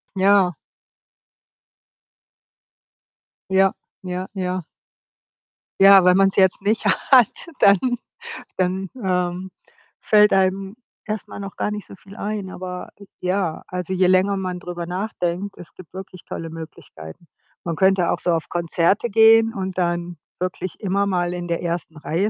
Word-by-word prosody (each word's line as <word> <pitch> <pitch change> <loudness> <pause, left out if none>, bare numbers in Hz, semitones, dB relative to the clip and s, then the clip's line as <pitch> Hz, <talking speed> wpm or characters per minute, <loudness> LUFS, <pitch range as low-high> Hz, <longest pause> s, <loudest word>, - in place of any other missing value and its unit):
Ja. 195 -1 +4 3.0
Ja. 190 0 +4 0.3
Ja. 185 0 -4
Ja. 185 -2 -3 1.2
Ja, 195 -1 +8
wenn 180 0 +6
man's 195 0 +3
jetzt 190 0 +3
nicht 215 +3 0
hat, 255 - +3
dann 200 -1 +6 0.8
dann, 185 +1 -1
ähm, 180 0 -1 0.5
fällt 210 -1 +4
einem 190 +1 +1 0.3
erst 215 0 -4
mal - - -9
noch 195 -1 -7
gar - - -2
nicht 210 -1 -6
so - - -11
viel 195 +1 -15
ein. 205 -3 -4
Aber 180 -1 -7
j 200 - -14
ja, 180 -3 -1
also, 180 0 -4
je 185 0 +2
länger 185 +2 +3
man 185 -2 -4
drüber 175 -1 -6
nachdenkt, 185 0 -3
es 170 -1 -12
gibt 185 -3 -14
wirklich 185 -2 -9
tolle 165 -1 -6
Möglichkeiten. 160 - -11 0.4
Man 170 -1 -3
könnte 190 0 +3
auch - - -1
so 175 - 0
auf 165 -2 -2
Konzerte 175 +6 +1
gehen 225 +1 +5
und 190 -1 -4
dann 175 0 -2 0.2
wirklich 185 0 -4
immer 200 0 0
mal 175 -2 0
in 175 -1 -5
der 170 0 -2
ersten 170 -2 -4
Reihe 165 +7 -1
185 Hz, 145 wpm, -21 LUFS, 175-195 Hz, 3.0 s, Ja